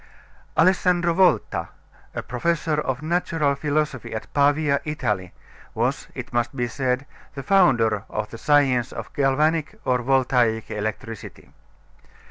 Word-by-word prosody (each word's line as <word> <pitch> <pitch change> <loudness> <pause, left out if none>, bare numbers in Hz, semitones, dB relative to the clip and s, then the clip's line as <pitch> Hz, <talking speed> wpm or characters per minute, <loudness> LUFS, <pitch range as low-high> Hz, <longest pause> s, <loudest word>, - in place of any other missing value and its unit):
Alessandro 175 0 +3
Volta, 185 +1 +2 0.5
a - - -3
professor 155 +4 -1
of 130 0 -3
natural 165 -3 +1
philosophy 145 -4 -2
at 110 - -7
Pavia, 145 0 +3
Italy, 105 - -2 0.4
was, - - -1
it - - -7
must 120 +1 0
be 120 -2 -1
said, 130 +2 -1 0.3
the 140 - -5
founder 120 - +3
of 105 0 -4
the 115 - -8
science 135 -4 +3
of - - -8
galvanic 155 +7 +1
or 125 -1 +1
voltaic 125 -3 +1
electricity. 110 +1 -6
135 Hz, 120 wpm, -23 LUFS, 120-155 Hz, 0.5 s, Alessandro